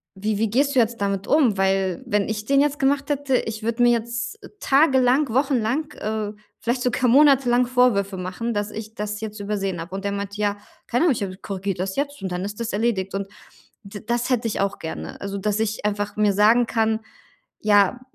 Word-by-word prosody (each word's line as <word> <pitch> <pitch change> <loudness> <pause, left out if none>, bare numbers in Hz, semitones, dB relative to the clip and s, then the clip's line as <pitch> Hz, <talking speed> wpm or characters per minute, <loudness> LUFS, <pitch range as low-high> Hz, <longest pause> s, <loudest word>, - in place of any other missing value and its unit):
wie 210 +2 -2
wie 225 0 +1
gehst 275 +5 +1
du - - +5
jetzt 230 0 +1
damit 200 -1 -1
um? 265 -9 +3
Weil 190 -2 +1
wenn 205 -1 +1
ich 215 -1 -3
den 275 +3 +3
jetzt 295 0 +1
gemacht 280 +1 +1
hätte, 285 -2 +1
ich 220 -2 -4
würde 230 +2 -1
mir 240 - +6
jetzt 235 - -3 0.2
tagelang, 270 -2 +3
wochenlang, 265 +2 +1
äh, 215 -1 -3 0.3
vielleicht 240 +2 -1
sogar 250 +1 +1
Monate 275 -1 +5
lang 245 +1 +4
Vorwürfe 230 -6 +2
machen, 185 +6 -3
dass 205 0 -2
ich 220 0 -7
das 210 0 -4
jetzt 215 -1 -6
übersehen 195 -3 -2
habe.“ 185 +3 -7
Und 195 - -5
der 200 - 0
meinte: 200 0 -5
„Ja, 205 0 0 0.3
keine 245 +8 +1
Ahnung, 320 - +4
ich, 230 - -5
äh, 185 -1 -5
korrigiert 195 -2 -4
das 190 +1 -2
jetzt 285 0 -2
und 190 - -3
dann 180 +1 -3
ist 205 +2 -6
das 230 - -3
erledigt.“ 205 -3 0
Und 195 0 -3 0.6
d 200 0 -9
das 240 +2 -1
hätte 235 -2 +1
ich 220 - -3
auch 200 0 -1
gerne. 160 - -7
Also, 200 0 -4
dass 210 +1 -1
ich 220 -1 -2
einfach 205 0 -2
mir 210 -1 +3
sagen 220 +4 +5
kann: 220 -1 +1 0.6
„Ja, 205 +3 +3
220 Hz, 210 wpm, -23 LUFS, 200-250 Hz, 0.6 s, mir